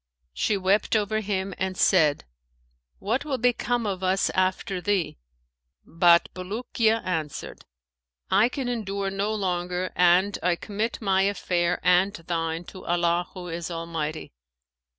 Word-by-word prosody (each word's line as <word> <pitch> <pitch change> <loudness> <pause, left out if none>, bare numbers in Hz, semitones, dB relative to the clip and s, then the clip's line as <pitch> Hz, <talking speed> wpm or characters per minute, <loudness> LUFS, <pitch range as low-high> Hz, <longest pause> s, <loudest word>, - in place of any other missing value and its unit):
She 205 - 0
wept 195 +4 +1
over 215 0 +1
him 195 -2 -2
and 185 -1 -2
said, 155 - +3 0.7
'What 230 +7 -1
will 285 -3 -2
become 245 -1 0
of 190 -3 -2
us 185 +1 +1
after 185 0 -1
thee?'; 195 - -1 0.7
but 170 0 +4
Bulukiya 220 +4 -1
answered, 160 -5 -4 0.7
'I 205 +5 +5
can 260 0 -4
endure 200 -5 -2
no 200 +2 -1
longer, 180 -3 -2
and 180 +3 +3
I 175 +1 +2
commit 215 +5 -4
my 190 -1 +3
affair 180 -3 0
and 180 +3 +3
thine 165 0 -3
to 185 +2 -11
Allah 175 0 +1
who 180 -1 -7
is 170 +1 -4
Almighty.' 165 - -4
190 Hz, 130 wpm, -25 LUFS, 175-205 Hz, 0.7 s, I